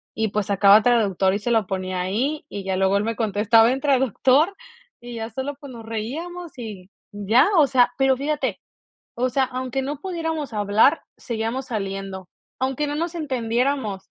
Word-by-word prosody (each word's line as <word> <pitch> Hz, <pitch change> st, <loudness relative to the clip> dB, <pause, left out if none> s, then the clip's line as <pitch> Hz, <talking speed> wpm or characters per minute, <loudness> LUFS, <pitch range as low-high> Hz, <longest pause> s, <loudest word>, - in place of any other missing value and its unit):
y 220 Hz, 0 st, 0 dB
pues, 210 Hz, 0 st, -2 dB
sacaba 200 Hz, +1 st, +6 dB
traductor, 200 Hz, -6 st, +2 dB
y 200 Hz, -, -1 dB
se 235 Hz, +3 st, -2 dB
lo 220 Hz, -4 st, +2 dB
ponía 185 Hz, -1 st, -3 dB
ahí. 250 Hz, +12 st, -2 dB
Y 200 Hz, -1 st, -6 dB
ya 190 Hz, -1 st, -1 dB
luego, 190 Hz, +1 st, +2 dB
él 205 Hz, -, -1 dB
me 230 Hz, 0 st, -2 dB
contestaba 225 Hz, +2 st, +3 dB
en 265 Hz, -, -1 dB
traductor. 270 Hz, -, +3 dB, 0.5 s
Y 240 Hz, 0 st, -8 dB
ya 225 Hz, 0 st, -5 dB
sólo, 265 Hz, +5 st, -5 dB
pues, 280 Hz, -2 st, -10 dB
nos 230 Hz, -2 st, -10 dB
reíamos, 315 Hz, +11 st, -5 dB
y 205 Hz, -6 st, -8 dB, 0.2 s
ya, 205 Hz, +5 st, +3 dB
o 310 Hz, -, +7 dB
sea. 250 Hz, -2 st, +3 dB
Pero 270 Hz, -1 st, +3 dB
fíjate, 295 Hz, +3 st, -2 dB, 0.6 s
o 250 Hz, +2 st, +1 dB
sea, 265 Hz, +2 st, +1 dB
aunque 255 Hz, +1 st, -3 dB
no 285 Hz, +1 st, -4 dB
pudiéramos 325 Hz, -6 st, -4 dB
hablar, 210 Hz, +8 st, +3 dB
seguíamos 235 Hz, +2 st, -4 dB
saliendo, 195 Hz, -3 st, -5 dB, 0.3 s
aunque 270 Hz, +3 st, -1 dB
no 290 Hz, -, -3 dB
nos 335 Hz, +2 st, -3 dB
entendiéramos. 250 Hz, -, -2 dB
235 Hz, 175 wpm, -23 LUFS, 205-270 Hz, 0.6 s, o